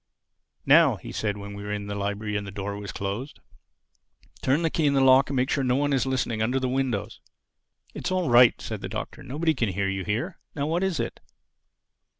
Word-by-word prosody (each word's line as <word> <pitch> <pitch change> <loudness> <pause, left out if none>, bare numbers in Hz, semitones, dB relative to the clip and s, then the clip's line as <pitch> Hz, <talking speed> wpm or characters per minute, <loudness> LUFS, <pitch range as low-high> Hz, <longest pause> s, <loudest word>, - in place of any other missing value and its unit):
"Now," - - +6
he - - -9
said, 105 -2 -2
when 100 0 -8
we 100 - -7
were 105 0 -5
inside 105 0 -4
the 100 - -4
library 105 +1 -3
and 100 -1 -2
the - - -6
door 100 0 -4
was 100 0 -6
closed, 100 +8 -5 1.0
"turn 140 +6 +2
the 165 - +1
key 155 -3 +1
in 140 - +2
the - - +4
lock 135 +1 +6
and 140 - -2
make 130 +2 +1
sure 140 - +1
there's 130 - 0
no 125 - +3
one 145 +1 +1
listening 130 -4 0
under 125 +4 +1
the 130 - -1
windows." 125 -5 -2 0.7
"It's - - -4
all 185 -3 0
right," 120 -1 +6
said - - -5
the - - -5
Doctor. - - -6
"Nobody 160 +5 0
can 120 -6 0
hear 100 +1 -1
you 95 0 -2
here. 120 - -3 0.2
Now 145 -2 -1
what 165 +4 0
is 190 -5 0
it?" - - -3
125 Hz, 220 wpm, -26 LUFS, 100-140 Hz, 1.0 s, Now